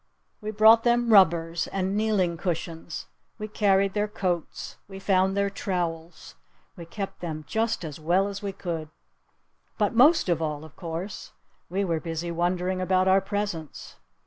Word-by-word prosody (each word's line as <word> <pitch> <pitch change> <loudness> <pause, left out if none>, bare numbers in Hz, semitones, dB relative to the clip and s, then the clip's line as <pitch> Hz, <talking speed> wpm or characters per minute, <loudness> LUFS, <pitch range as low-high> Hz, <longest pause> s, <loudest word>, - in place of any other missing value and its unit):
We 210 - -4
brought 220 +2 +6
them 240 -1 +3
rubbers. 170 -3 +4
And 190 0 -2
kneeling 205 -5 +1
cushions. 165 -1 -4 0.3
We 215 -1 -5
carried 200 -2 +2
their 210 0 0
coats. 180 -5 -3
We 195 -1 -9
found 190 0 +2
their 200 0 +1
trowels. 170 -4 -4 0.4
We 170 -2 -10
kept 195 +3 -6
them 155 -3 -5
just 220 -5 -1
as 150 -1 -7
well 175 +5 +2
as 200 +1 -6
we 200 -1 -3
could. 170 -5 -5 0.9
But, 210 -1 +1
most 280 +6 +5
of 170 -2 +1
all, 150 -1 -3
of 155 - -15
course, 175 +3 -6 0.4
we 195 +3 0
were 165 -3 0
busy 165 +1 -4
wondering 180 +2 -1
about 185 0 +2
our 190 +1 +5
presents. 200 -8 -5
185 Hz, 155 wpm, -26 LUFS, 170-205 Hz, 0.9 s, brought